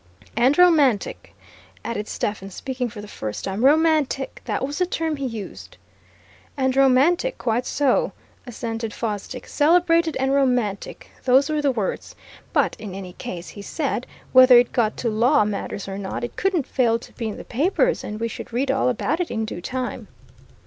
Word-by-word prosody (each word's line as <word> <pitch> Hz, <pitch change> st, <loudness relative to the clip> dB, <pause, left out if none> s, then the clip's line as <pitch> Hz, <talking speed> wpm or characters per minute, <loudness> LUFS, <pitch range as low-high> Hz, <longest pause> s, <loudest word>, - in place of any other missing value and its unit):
"And 250 Hz, +5 st, +3 dB
romantic," 300 Hz, -, +3 dB, 0.5 s
added 210 Hz, -2 st, -3 dB
Stephens, 195 Hz, -2 st, -4 dB
speaking 255 Hz, -2 st, -3 dB
for 210 Hz, -1 st, -9 dB
the 210 Hz, -, -10 dB
first 110 Hz, -, -6 dB
time. 195 Hz, +4 st, -2 dB
"Romantic! 300 Hz, -2 st, +2 dB
That -, -, -1 dB
was 285 Hz, +4 st, -5 dB
the 360 Hz, -, +2 dB
term 320 Hz, -4 st, -2 dB
he 275 Hz, -1 st, -2 dB
used." 225 Hz, -5 st, -8 dB, 0.8 s
"And 260 Hz, -1 st, +1 dB
romantic 275 Hz, -, +3 dB
quite 240 Hz, +1 st, -1 dB
so," 275 Hz, -3 st, +1 dB, 0.4 s
assented 225 Hz, -2 st, -4 dB
Fosdick. 225 Hz, +3 st, -4 dB
"Celebrated 330 Hz, +1 st, +3 dB
and 265 Hz, +1 st, +1 dB
romantic 250 Hz, -7 st, 0 dB
those 265 Hz, +4 st, +4 dB
were 305 Hz, -1 st, 0 dB
the 285 Hz, -2 st, +2 dB
words. 215 Hz, -6 st, -3 dB, 0.4 s
But -, -, +2 dB
in 205 Hz, -3 st, -7 dB
any 185 Hz, -2 st, -7 dB
case, 175 Hz, 0 st, -7 dB
he 205 Hz, -, -10 dB
said, 265 Hz, +2 st, -3 dB, 0.3 s
whether 255 Hz, -1 st, +9 dB
it 240 Hz, 0 st, +4 dB
got 225 Hz, -4 st, 0 dB
to 240 Hz, -, -2 dB
law 235 Hz, +3 st, +3 dB
matters 200 Hz, -1 st, -4 dB
or 195 Hz, 0 st, -5 dB
not, 195 Hz, +4 st, -4 dB
it 240 Hz, -, -5 dB
couldn't 365 Hz, -7 st, 0 dB
fail 235 Hz, -3 st, +2 dB
to 230 Hz, -, -14 dB
be 230 Hz, -, -4 dB
in 210 Hz, -, -6 dB
the -, -, -8 dB
papers, 360 Hz, -, +1 dB
and 210 Hz, +1 st, -5 dB
we 230 Hz, -, -1 dB
should 230 Hz, -, -8 dB
read 260 Hz, +3 st, 0 dB
all 265 Hz, -1 st, +2 dB
about 295 Hz, +6 st, -1 dB
it 355 Hz, -, -1 dB
in 220 Hz, -1 st, -2 dB
due 195 Hz, -5 st, -6 dB
time." 255 Hz, +6 st, -4 dB
250 Hz, 175 wpm, -23 LUFS, 215-285 Hz, 0.8 s, whether